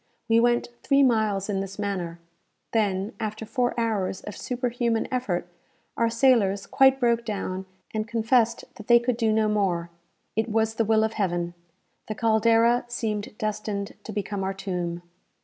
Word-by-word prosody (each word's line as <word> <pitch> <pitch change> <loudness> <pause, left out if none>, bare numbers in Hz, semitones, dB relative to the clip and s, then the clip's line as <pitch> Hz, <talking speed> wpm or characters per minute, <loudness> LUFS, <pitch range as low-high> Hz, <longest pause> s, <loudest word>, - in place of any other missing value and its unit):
We 225 0 +4
went 240 0 +2
three 275 0 +4
miles 215 -6 +2
in 200 -2 -1
this 195 0 -5
manner. 190 -5 -3 0.5
Then, 205 -2 0
after 220 0 -4
four 245 0 -1
hours 210 -5 -1
of 210 - -8
superhuman 240 -2 -1
effort, 210 -10 -1 0.5
our 230 0 +2
sailors 230 -5 +3
quite 270 0 +4
broke 235 -2 +2
down, 190 -3 -4 0.3
and 215 0 -2
confessed 230 0 +2
that 215 - -11
they 240 - +8
could 240 +1 0
do 225 -2 +1
no 215 0 +2
more. 185 -5 0 0.4
It 220 +2 0
was 220 0 +1
the 225 0 0
will 220 0 +3
of 220 0 0
Heaven. 175 -4 -1 0.5
The 215 - -4
"Caldera" 230 +2 +3
seemed 215 -3 -3
destined 210 -2 -3
to - - -7
become 200 -1 -3
our 190 0 -2
tomb. 175 -3 -3
220 Hz, 160 wpm, -26 LUFS, 195-235 Hz, 0.5 s, they